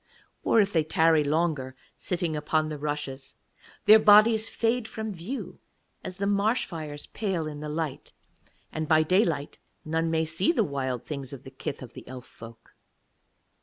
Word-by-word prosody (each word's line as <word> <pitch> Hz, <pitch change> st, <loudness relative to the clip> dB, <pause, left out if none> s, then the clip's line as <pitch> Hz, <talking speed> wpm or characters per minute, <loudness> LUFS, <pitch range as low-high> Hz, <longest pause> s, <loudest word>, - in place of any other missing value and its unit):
Or 230 Hz, -, +4 dB
if 200 Hz, -1 st, +2 dB
they 160 Hz, -2 st, +3 dB
tarry 160 Hz, 0 st, +3 dB
longer, 145 Hz, -4 st, 0 dB, 0.2 s
sitting 175 Hz, -3 st, -2 dB
upon 155 Hz, +1 st, 0 dB
the 150 Hz, -1 st, -5 dB
rushes, 145 Hz, -2 st, -4 dB, 0.5 s
their 215 Hz, +1 st, +9 dB
bodies 215 Hz, +1 st, +6 dB
fade 230 Hz, 0 st, 0 dB
from 220 Hz, -1 st, -5 dB
view 195 Hz, +10 st, -6 dB, 0.4 s
as 185 Hz, -1 st, -6 dB
the 200 Hz, -, -1 dB
marsh 205 Hz, +4 st, +1 dB
fires 155 Hz, -4 st, -7 dB
pale 190 Hz, -7 st, -2 dB
in 150 Hz, -1 st, -6 dB
the 150 Hz, 0 st, -5 dB
light, 155 Hz, -2 st, -4 dB, 0.6 s
and 155 Hz, 0 st, -3 dB
by 155 Hz, 0 st, +5 dB
daylight 165 Hz, -4 st, +1 dB, 0.3 s
none 165 Hz, +1 st, 0 dB
may 160 Hz, 0 st, +1 dB
see 165 Hz, -, +1 dB
the 235 Hz, -, +2 dB
Wild 130 Hz, -, -3 dB
Things 140 Hz, -3 st, -6 dB
of 135 Hz, -, -9 dB
the 135 Hz, -, -11 dB
kith 135 Hz, 0 st, -6 dB
of 125 Hz, -, -11 dB
the -, -, -11 dB
Elf 130 Hz, -1 st, -9 dB
folk. 115 Hz, 0 st, -14 dB
160 Hz, 165 wpm, -27 LUFS, 145-200 Hz, 0.6 s, their